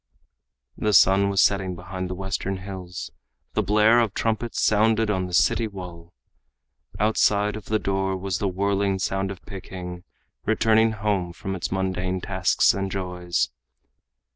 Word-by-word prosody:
The 105 -1 +1
sun 100 +1 +5
was 100 0 +4
setting 95 -2 +1
behind 95 0 -6
the 90 - -4
Western 95 +1 -3
hills. 95 -2 -7 0.4
The - - +2
blare 105 +3 +4
of 115 -4 0
trumpets 115 +1 -1
sounded 110 0 +3
on 95 -2 -1
the 90 - -9
city 115 +5 +3
wall. 90 -4 -9 0.9
Outside 105 -1 +2
of 110 - -8
the 110 - +1
door 95 -2 -1
was 95 -1 -3
the 100 - 0
whirling 100 +1 0
sound 95 +1 -1
of 100 -2 -8
Peking 90 -2 -8 0.4
returning 110 0 +3
home 100 -4 -1
from 95 +2 -5
its 90 - -4
mundane 95 -1 -1
tasks - - +2
and 95 +1 -3
joys. 90 -2 -2
95 Hz, 145 wpm, -24 LUFS, 95-105 Hz, 0.9 s, sun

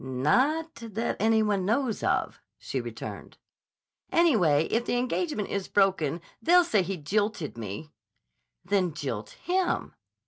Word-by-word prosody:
"Not 255 - +1
that 225 0 -2
any 220 +1 +3
one 205 -3 +1
knows 230 +3 0
of," - - 0 0.2
she - - -4
returned. - - -8 0.7
"Anyway, 195 - +4
if 230 +2 +2
the 245 - 0
engagement 250 - -1
is 200 -1 -2
broken, 180 -5 +2 0.2
they'll 355 +2 +6
say 220 - +2
he 185 +1 -3
jilted 205 +1 -1
me." 115 +7 -7 0.7
"Then 185 -6 +1
jilt 130 -8 -4
him." 365 +1 0
205 Hz, 130 wpm, -27 LUFS, 155-245 Hz, 0.7 s, they'll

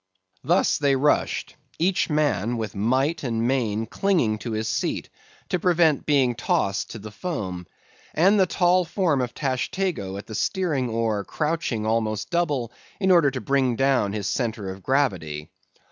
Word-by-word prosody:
Thus - - +2
they 140 -2 +3
rushed; 145 +3 0 0.2
each 180 +2 +1
man 145 -7 +1
with 110 -3 -4
might 130 +10 +1
and 115 -2 0
main 115 -4 0
clinging 120 - +1
to 110 +3 -5
his 110 +1 -2
seat, 115 - -2 0.4
to 180 - 0
prevent 170 -4 +2
being 135 -5 +3
tossed 100 -4 -1
to - - -7
the 105 0 -9
foam; 100 - -5 0.5
and 195 +6 +4
the 190 - +4
tall 180 +1 +3
form 170 -5 0
of 125 -1 -4
Tashtego 130 - -2
at 100 - -8
the 110 - -9
steering 145 - 0
oar 110 -2 -1
crouching 150 -6 -2
almost 110 -2 -1
double, 145 -9 0 0.3
in 190 -2 +3
order 170 -6 +5
to 130 -2 -5
bring 130 +1 +1
down 135 -5 +2
his 105 -3 -3
centre 110 -6 -2
of 95 +1 -10
gravity. 90 - -1
130 Hz, 160 wpm, -24 LUFS, 110-160 Hz, 0.5 s, order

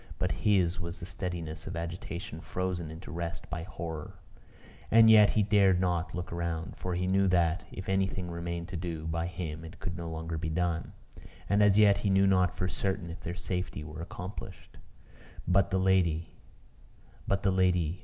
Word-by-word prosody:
But - - 0
his 95 -4 +2
was 85 0 -5
the 85 - -6
steadiness 85 -3 -5
of 85 - -4
agitation 85 +1 -5
frozen 90 -3 -3
into 80 +3 -9
rest 85 0 -4
by - - -3
horror. 80 -3 -6 0.7
As 115 0 +7
yet 110 -2 +8
he 105 - +5
dared 100 -3 +4
not 90 -2 0
to - - -8
look 90 - -5
round; 85 -1 -3
for 90 -1 -3
he 90 +1 0
knew 95 +1 +3
that, 85 -1 +2
if 95 - -7
anything 95 -2 0
remained 85 0 -4
to 90 - -6
do, 80 -2 -4
by 85 +1 -1
him 85 -3 -5
it 80 - -10
could 85 - -4
no 85 -1 -5
longer 80 0 -4
be 80 -1 -2
done. 85 0 -1 0.5
And 100 +2 +3
as 105 -1 +5
yet 100 -2 +6
he 100 - 0
knew 95 0 +4
not 95 -2 +3
for 90 - 0
certain 95 -2 -2
if 85 - -8
their 85 - -5
safety 90 -3 -3
were 75 +1 -8
accomplished. 90 +3 -8 0.7
But 95 +2 +4
the 95 - +1
lady 90 -4 +2 1.0
But 100 - 0
the 95 - +3
lady 90 -2 +2
90 Hz, 185 wpm, -30 LUFS, 85-95 Hz, 1.0 s, yet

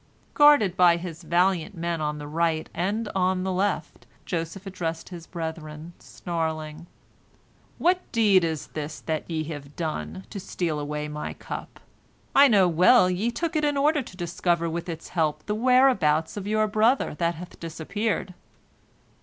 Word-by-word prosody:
Guarded 290 -11 +6
by 175 -2 +5
his 170 -1 -7
valiant 180 +2 +1
men 170 -1 -2
on 150 0 -2
the 150 - -7
right 160 +1 0
and 205 +6 -1
on 185 -1 +1
the 190 - -1
left, 190 +1 -2 0.2
Joseph 175 +3 -4
addressed 165 -4 -4
his 170 -3 -9
brethren, 160 -1 -6
snarling, 160 -1 -4 0.9
"What 360 +1 +3
deed 205 -6 +4
is 160 -3 -2
this 150 0 -5
that 160 0 -3
ye 160 -2 -1
have 145 -1 -10
done, 95 - -4
to 200 - -5
steal 175 -5 -2
away 150 +1 -3
my 150 0 -5
cup? - - -8 0.5
I 280 +1 +8
know 200 -7 +5
well, 180 +4 +5
ye 195 +6 0
took 320 +8 -3
it 305 - +1
in 290 -1 +1
order 295 +1 +3
to 185 -7 -11
discover 170 -1 0
with 170 +2 -4
its 165 -1 -6
help 155 -3 -1
the 210 - -1
whereabouts 215 - +3
of 205 -1 -5
your 215 +1 +2
brother 220 +5 +2
that 170 0 +1
hath 175 +3 -10
disappeared." 185 +5 -3
175 Hz, 160 wpm, -25 LUFS, 160-205 Hz, 0.9 s, I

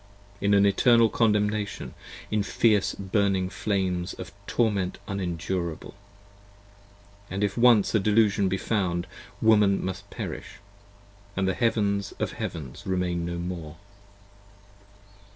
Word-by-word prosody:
In 100 +1 +3
an 100 0 +5
eternal 115 +3 +5
condemnation, 105 -2 0 0.4
in 105 -1 +2
fierce 105 0 +2
burning 95 -1 0
flames 95 -5 -1
Of 95 0 -8 0.2
torment 100 -6 0
unendurable: 90 -3 -3 1.4
and 100 +2 -2
if 100 -2 0
once 120 -4 +5
a 110 - +4
Delusion 105 -1 +3
be 95 - 0
found 90 -4 -1 0.4
15 - - 0
Woman 105 -3 +4
must 95 -1 -5
perish - - -6 0.4
& 100 0 -27
the 95 0 +1
Heavens 100 -1 0
of - - -3
Heavens 70 -4 -6
remain 90 -2 -1
no 85 0 -3
more. 85 -3 -5
100 Hz, 115 wpm, -26 LUFS, 90-105 Hz, 1.4 s, an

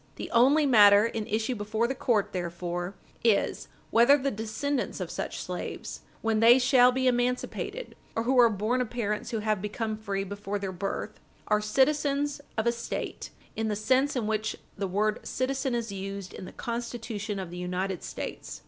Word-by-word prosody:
The - - -7
only 275 +6 +5
matter 205 -5 +7
in 225 -2 -3
issue 220 +4 0
before 215 +1 -1
the 265 - -1
court, 245 -7 0
therefore, 175 +1 -3 0.3
is, 225 -3 +2 0.2
whether 240 +5 +6
the 275 0 -1
descendants 225 +6 -2
of - - -4
such - - -4
slaves, - - -5 0.2
when 225 -1 +2
they 235 +3 +8
shall 250 -1 +5
be 260 +1 -1
emancipated, 250 - -1 0.2
or 225 - 0
who 255 +2 +3
are 235 -1 +8
born 220 +5 0
of 245 - -2
parents 210 -3 -2
who 225 -2 -2
had 215 -2 0
become 215 +1 -3
free 200 -2 -3
before 205 +1 -4
their 195 -1 -4
birth, 195 +3 -4 0.3
are 210 0 +3
citizens 285 +5 +1 0.2
of 220 - +1
a 235 - +4
State 235 0 -5 0.3
in 220 0 -1
the 210 - 0
sense 260 +7 +2
in 240 -4 0
which 215 0 -1 0.2
the 200 -1 -2
word 210 +3 0
"citizen" 260 0 -1
is 230 -3 -2
used 195 -1 -6
in 185 - -8
the - - -9
Constitution 230 -3 -4
of 185 -3 -5
the 175 - -7
United 180 +1 -2
States. - - -6
220 Hz, 180 wpm, -28 LUFS, 205-250 Hz, 0.3 s, they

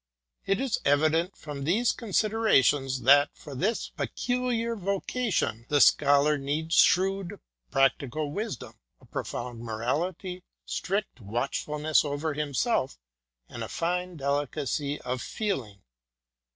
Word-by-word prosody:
It 195 0 +2
is 265 -4 0
evident 155 +5 +2
from 145 -2 -7
these 210 - +2
considerations, 185 - +2
that, 145 +3 +6
for 145 - -10
his 205 - -1
pe - - -2
culiar 245 -2 -1
vocation, 195 - -1
the 145 - +3
Scholar 145 +1 +5
needs 155 +4 -2
shrewd 195 +1 +3 0.3
practical 140 +2 +1
wisdom, 205 - -5 0.2
a - - -20
profound 120 -2 -5
morality, 155 - -3 0.2
strict 195 - -3
watchfulness 145 +8 0
over 145 +1 -2
himself, 145 - 0 0.5
and - - -6
a - - -4
fine 180 +1 -2
delicacy 145 0 -1
of 125 0 -3
feeling. 130 - -3
150 Hz, 110 wpm, -28 LUFS, 140-195 Hz, 0.5 s, that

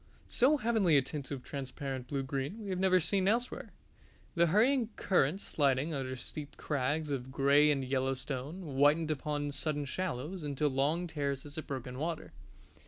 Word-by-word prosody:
So 280 +5 +4
heavenly 215 - +3
a 135 - +4
tint 140 +1 -5
of 135 -3 -5
transparent 135 -1 -5
blue 140 0 -2
green 135 +7 -3
we 200 - -4
have 185 - -1
never 185 -1 +4
seen 185 +3 +1
elsewhere, 240 +4 0 0.6
the 170 -1 +4
hurrying 230 - +3
current 180 0 +2
sliding 140 +2 +1
under 130 -2 -3
steep 145 +3 -7
crags 145 +2 -1
of 130 -1 -3
gray 140 +2 +5
and 135 -3 +1
yellow 135 0 0
stone, 140 +7 -5
whitened 150 +2 +3
upon 145 -1 -2
sudden 145 +1 -2
shallows 165 +2 -3
into 145 0 0
long 145 +6 +1
terraces 145 -2 -3
of - - -8
broken 130 -1 -5
water. 160 +1 -3
145 Hz, 165 wpm, -32 LUFS, 135-170 Hz, 0.6 s, gray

